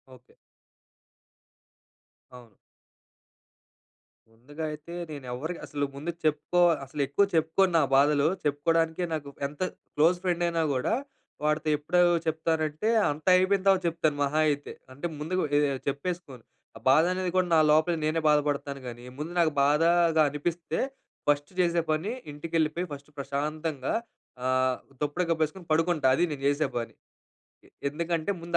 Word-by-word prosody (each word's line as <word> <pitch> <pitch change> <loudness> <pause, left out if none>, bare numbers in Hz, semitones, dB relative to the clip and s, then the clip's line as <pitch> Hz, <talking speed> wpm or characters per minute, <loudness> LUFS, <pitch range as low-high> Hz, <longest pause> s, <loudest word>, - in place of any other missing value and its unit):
Okay. 125 0 -23 2.0
అవును. 120 -4 -15 1.8
ముందుగా 145 +8 -9
అయితే, 155 +3 -9 0.2
నేను 145 -3 -8
ఎవ్వరికి 160 +8 -5
అసలు 145 -1 -2
ముందుక్ 165 +4 -5
చెప్పుకో 155 +3 +1 0.2
అసలెక్కువ 140 +6 0
చెప్పుకోను 165 +4 +3
నా 160 - +4
బాధలు. 145 +1 +4 0.2
చెప్పుకోడానికే 160 +4 +1
నాకు 145 -3 -4 0.2
ఎంత 145 +3 -14 0.3
క్లోజ్ 165 +4 +4
ఫ్రెండ్ 175 -2 0
అయినా 170 -1 0
గూడా, 130 - 0 0.5
వాడితో 150 +1 +1
ఎప్పుడు 160 +5 +1 0.3
చెప్తానంటే, 160 +3 0 0.2
అంతా 155 +5 -2
అయిపోయిన 185 +1 +2
తర్వాత 190 -1 +5
చెప్తాను 160 -3 0
మహా 150 +3 0
అయితే. 145 0 -3 0.2
అంటే, 145 +6 -7
ముందుగా 180 +5 -1 0.2
ఎ - - +5
ఏహ్! 135 - -3
చెప్పేసుకోను. 140 -3 -4 0.3
ఆ - - -12
బాధ 155 +4 +6
అనేది 185 0 -2
కూడా 185 - +3
నా - - +6
లోపల, 155 +3 +4
నేనే 160 +1 0
బాధపడతాను 145 -2 0
గానీ, 120 0 -8 0.2
ముందు 155 +3 -4
నాకు 165 -2 +4
బాధగా 165 +2 +4
అనిపిస్తే, 165 +3 -3 0.5
ఫస్ట్ 145 +2 +1
చేసే 170 -1 +2
పని, 160 +8 -1 0.2
ఇంటికెళ్ళిపేయి, 165 +3 -1
ఫస్ట్ 140 +1 -10
ప్రశాంతంగా, 145 +1 -3 0.5
ఆహ్, 130 0 +2 0.2
దుప్పటి 150 +5 0
కప్పేసుకుని 160 +3 -1
పడుకుంటా. 160 -3 +2
అది 175 - +1
నేను 140 -2 -6
చేసే 145 +1 +1
పని. 115 -1 -4 0.7
ఎ - - -21 0.2
ఎందుకంటే, 165 +3 -2
ముందు 170 0 0
155 Hz, 135 wpm, -27 LUFS, 145-170 Hz, 2.0 s, బాధ